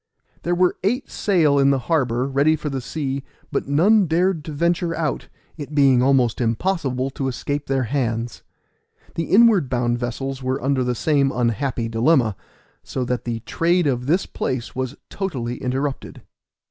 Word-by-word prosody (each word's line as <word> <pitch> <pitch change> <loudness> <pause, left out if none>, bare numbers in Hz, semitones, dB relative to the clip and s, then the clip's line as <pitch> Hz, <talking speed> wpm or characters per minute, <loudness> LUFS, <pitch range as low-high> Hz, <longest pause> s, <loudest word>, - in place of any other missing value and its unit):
There 175 +1 0
were 180 0 +2
eight 245 +7 -1
sail 160 -8 +2
in 135 0 +4
the 140 - +3
harbor, 130 -7 +1
ready 140 +3 +3
for 150 -1 -5
the 135 -1 -3
sea, 135 0 -3 0.3
but - - -2
none 185 +8 +4
dared 170 0 +1
to 160 - -6
venture 170 +2 0
out, 155 -3 -2 0.3
it 150 -1 -7
being 135 -4 +5
almost 130 -3 +2
impossible 130 - -1
to 135 0 -3
escape 145 +3 -3
their 135 -1 +1
hands. 120 -2 -2 0.7
The 165 - -2
inward 205 - +5
bound 120 -1 0
vessels 135 +2 -4
were 130 +1 -1
under 135 0 0
the 125 0 -1
same 140 +1 +2
unhappy 120 0 -1
dilemma, 115 -1 +2 0.5
so 130 - -4
that 125 -1 -2
the 115 -1 -3
trade 170 +7 +1
of 125 -3 -1
this 175 +6 +2
place 130 -2 -4
was 130 +1 -3 0.2
totally 125 -11 -3
interrupted. 135 +2 -3
135 Hz, 160 wpm, -22 LUFS, 125-160 Hz, 0.7 s, being